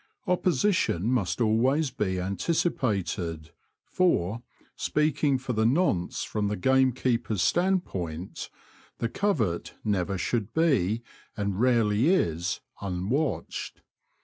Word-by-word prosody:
Oppo 180 Hz, 0 st, +2 dB
sition 170 Hz, -, +1 dB
must 115 Hz, -4 st, 0 dB
alwavs 125 Hz, +6 st, +2 dB
be 95 Hz, -3 st, -1 dB
an 95 Hz, +2 st, -2 dB
ticipated, 95 Hz, -, -1 dB, 0.3 s
for, 115 Hz, -, +1 dB, 0.3 s
speaking 150 Hz, -2 st, +1 dB
for 125 Hz, 0 st, -4 dB
the 110 Hz, 0 st, +1 dB
nonce 115 Hz, -, +1 dB
from 105 Hz, -1 st, -2 dB
the 105 Hz, -, -1 dB
game 130 Hz, +6 st, +3 dB
keeper's 115 Hz, -5 st, 0 dB
stand 185 Hz, +1 st, +2 dB
point, 85 Hz, 0 st, -5 dB, 0.5 s
the 115 Hz, -, -1 dB
covert 120 Hz, -, -1 dB
never 100 Hz, -2 st, 0 dB
should 110 Hz, +3 st, -2 dB
be, 120 Hz, -, +2 dB, 0.3 s
and 100 Hz, -2 st, -2 dB
rarely 115 Hz, -4 st, +3 dB
^ 145 Hz, -, +4 dB
7 190 Hz, -, +4 dB
is, 85 Hz, +2 st, -3 dB, 0.2 s
unwatched. 100 Hz, -, -2 dB
115 Hz, 120 wpm, -27 LUFS, 95-140 Hz, 0.5 s, ^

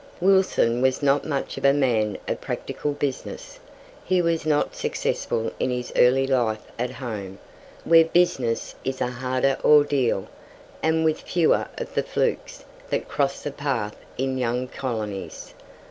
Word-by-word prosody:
Wilson 185 Hz, -11 st, +3 dB
was 130 Hz, +2 st, +1 dB
not 140 Hz, 0 st, +3 dB
much 140 Hz, -3 st, -3 dB
of -, -, -13 dB
a 140 Hz, -, +6 dB
man 115 Hz, -7 st, +1 dB
of -, -, -2 dB
practical 150 Hz, -, -3 dB
business. 145 Hz, -, -5 dB, 0.4 s
He 185 Hz, -1 st, +2 dB
was 165 Hz, -2 st, 0 dB
not 150 Hz, -1 st, +1 dB
successful 115 Hz, -1 st, -2 dB
in -, -, 0 dB
his 125 Hz, -1 st, -3 dB
early 130 Hz, +2 st, +5 dB
life 120 Hz, -5 st, 0 dB, 0.2 s
at 125 Hz, +1 st, 0 dB
home, 105 Hz, -7 st, -6 dB, 0.5 s
where 165 Hz, -1 st, +6 dB
business 150 Hz, -9 st, +1 dB
is 130 Hz, 0 st, -3 dB
a 125 Hz, -, -1 dB
harder 130 Hz, +2 st, 0 dB
ordeal, 145 Hz, -9 st, +4 dB, 0.5 s
and 160 Hz, 0 st, +2 dB
with 155 Hz, -1 st, +1 dB
fewer 170 Hz, -3 st, +2 dB
of -, -, -6 dB
the -, -, +1 dB
"flukes" -, -, -2 dB, 0.2 s
that -, -, -1 dB
cross 140 Hz, -1 st, -1 dB
the 145 Hz, -, -3 dB
path 130 Hz, -8 st, -2 dB, 0.2 s
in 130 Hz, 0 st, -1 dB
young 125 Hz, +1 st, -1 dB
colonies. 110 Hz, -7 st, -5 dB
130 Hz, 145 wpm, -24 LUFS, 120-150 Hz, 0.5 s, a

